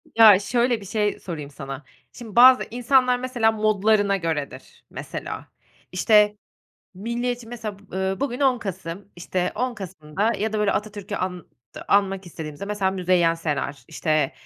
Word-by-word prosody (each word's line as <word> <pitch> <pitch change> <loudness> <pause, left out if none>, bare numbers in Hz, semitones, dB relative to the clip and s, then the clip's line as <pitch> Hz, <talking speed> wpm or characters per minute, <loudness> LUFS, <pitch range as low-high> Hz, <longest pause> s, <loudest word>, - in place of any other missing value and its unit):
Ya, 215 -4 +8
şöyle 235 +1 +1
bir - - -10
şey 210 +1 -1
sorayım 150 -5 -6
sana, 135 0 -8 0.3
şimdi 225 -5 -10
bazı 255 +1 +8
insanlar, 250 +1 +3
mesela, 245 -3 +1
modlarına 210 -1 +2
göredir, 160 -5 -5
mesela. - - -7 0.4
İşte, 210 +2 +4 0.6
milliyetçi, 240 +3 -3
mesela, 220 -4 -6
b 200 -2 -10
eee, 190 +3 -1
bugün 270 -1 -2
10 260 -3 +3
Kasım, 190 -1 -6
işte, 180 +1 -2
10 250 -1 -2
Kasım'da 190 +2 -2
ya 220 +1 -2
da 215 - -1
böyle 210 -1 +2
Atatürk'ü 205 -1 -4
ant 180 -2 -3 0.4
anmak 195 -2 +2
istediğimizde, 155 +1 -7
mesela, 200 -2 0
Müzeyyen 180 -3 +2
Senar, 145 -3 -3
işte, 155 -3 0
205 Hz, 145 wpm, -23 LUFS, 180-230 Hz, 0.6 s, Ya